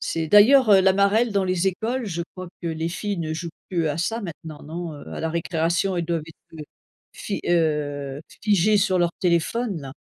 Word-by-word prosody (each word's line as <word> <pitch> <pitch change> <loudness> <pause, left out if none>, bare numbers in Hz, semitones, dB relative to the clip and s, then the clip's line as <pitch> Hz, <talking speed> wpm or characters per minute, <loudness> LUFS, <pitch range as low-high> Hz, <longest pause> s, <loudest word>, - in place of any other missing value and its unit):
C'est 165 -1 -2
d'ailleurs, 225 - +6
heu, 195 -2 +7
la 190 0 +4
marelle 200 +5 +3
dans 200 -1 +1
les 185 0 +1
écoles, 230 +7 -3
je 170 -3 -3
crois 185 -1 -7
que 175 - -5
les 160 0 -2
filles 200 +3 -3
ne 160 -2 -3
jouent 160 +2 -5 0.2
plus 170 -3 0
à 145 - -2
ça 225 +7 -1
maintenant, 160 -5 -8
non? 165 +2 -6
Heu, 145 - -11
à - - -5
la 160 - -2
récréation, 170 +3 0
elles 170 - -1
doivent 165 -1 -2
être, 165 0 -16
heu, - - -6 0.5
fi 200 - -5
heu, 145 -4 0 0.2
figer 210 0 +3
sur 190 -2 +2
leur 175 -1 +1
téléphone, 180 +3 0
là. 135 -1 -9
175 Hz, 210 wpm, -23 LUFS, 160-200 Hz, 0.5 s, heu